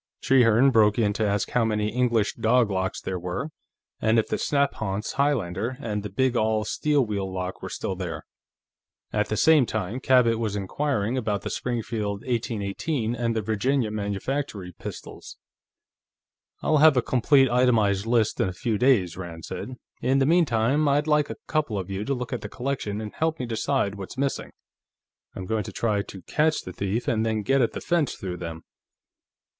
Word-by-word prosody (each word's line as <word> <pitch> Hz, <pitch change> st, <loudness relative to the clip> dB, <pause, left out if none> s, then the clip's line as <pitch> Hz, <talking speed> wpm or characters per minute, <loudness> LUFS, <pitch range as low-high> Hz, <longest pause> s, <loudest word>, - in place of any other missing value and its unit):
Trehearne 125 Hz, 0 st, +5 dB
broke 105 Hz, -3 st, +4 dB
in 105 Hz, -3 st, +2 dB
to 110 Hz, 0 st, 0 dB
ask 100 Hz, 0 st, -1 dB
how 125 Hz, -, +2 dB
many 105 Hz, -1 st, 0 dB
English 120 Hz, -2 st, +1 dB
dog 115 Hz, -1 st, +2 dB
locks 95 Hz, -1 st, -1 dB
there 95 Hz, -1 st, -3 dB
were, 90 Hz, -, -4 dB, 0.5 s
and 110 Hz, +1 st, +3 dB
if 110 Hz, -, +1 dB
the -, -, -1 dB
snaphaunce 110 Hz, -8 st, -1 dB
Highlander 120 Hz, -5 st, 0 dB
and 105 Hz, -6 st, -3 dB
the 105 Hz, -, -6 dB
big 130 Hz, +1 st, +1 dB
all 110 Hz, -1 st, +1 dB
steel 145 Hz, -3 st, +1 dB
wheel 100 Hz, -3 st, -3 dB
lock 90 Hz, 0 st, -4 dB
were -, -, -6 dB
still 95 Hz, -, -3 dB
there. 85 Hz, -4 st, -5 dB, 0.9 s
At 105 Hz, 0 st, 0 dB
the 110 Hz, -, -1 dB
same 155 Hz, -3 st, +5 dB
time, 110 Hz, +3 st, -3 dB
Cabot 125 Hz, -4 st, +3 dB
was 110 Hz, -3 st, -2 dB
inquiring 115 Hz, +3 st, -1 dB
about 105 Hz, -4 st, -2 dB
the -, -, -4 dB
Springfield 110 Hz, -4 st, -3 dB
1818 115 Hz, +1 st, -2 dB
and 115 Hz, -1 st, -1 dB
the 110 Hz, -, -1 dB
Virginia 110 Hz, +3 st, 0 dB
Manufactory 100 Hz, 0 st, -3 dB
pistols. -, -, -9 dB, 1.3 s
"I'll 155 Hz, -, +3 dB
have 150 Hz, -2 st, +6 dB
a 125 Hz, -, +3 dB
complete, 135 Hz, +2 st, +4 dB
itemized 115 Hz, -5 st, +2 dB
list 115 Hz, -2 st, +2 dB
in 95 Hz, -, +2 dB
a -, -, -6 dB
few 105 Hz, +3 st, -2 dB
days," 110 Hz, -10 st, +3 dB
Rand 85 Hz, -3 st, -7 dB
said. 130 Hz, -, -6 dB, 0.3 s
"In 130 Hz, +1 st, +2 dB
the 135 Hz, -, +3 dB
meantime, 145 Hz, -3 st, +3 dB
I'd 145 Hz, +1 st, +2 dB
like 150 Hz, -1 st, +2 dB
a -, -, -6 dB
couple 150 Hz, -9 st, -1 dB
of 95 Hz, 0 st, -4 dB
you 95 Hz, +1 st, -3 dB
to 140 Hz, -, 0 dB
look 125 Hz, -1 st, -5 dB
at -, -, -3 dB
the -, -, -6 dB
collection 125 Hz, -6 st, -3 dB
and 105 Hz, -1 st, -6 dB
help 160 Hz, 0 st, 0 dB
me 125 Hz, -, -2 dB
decide 115 Hz, -2 st, 0 dB
what's 100 Hz, +4 st, -8 dB
missing. 140 Hz, 0 st, -1 dB, 0.9 s
I'm 95 Hz, -, -5 dB
going 110 Hz, +2 st, -1 dB
to -, -, -7 dB
try 105 Hz, -3 st, 0 dB
to 95 Hz, -2 st, -10 dB
catch 155 Hz, -, +1 dB
the 95 Hz, -, -8 dB
thief, 100 Hz, +6 st, -2 dB
and 110 Hz, -1 st, +1 dB
then 110 Hz, -1 st, -1 dB
get 135 Hz, +4 st, +2 dB
at 115 Hz, -, +1 dB
the -, -, -5 dB
fence 170 Hz, -5 st, 0 dB
through 90 Hz, -2 st, -5 dB
him." 80 Hz, -2 st, -7 dB
115 Hz, 185 wpm, -25 LUFS, 100-130 Hz, 1.3 s, have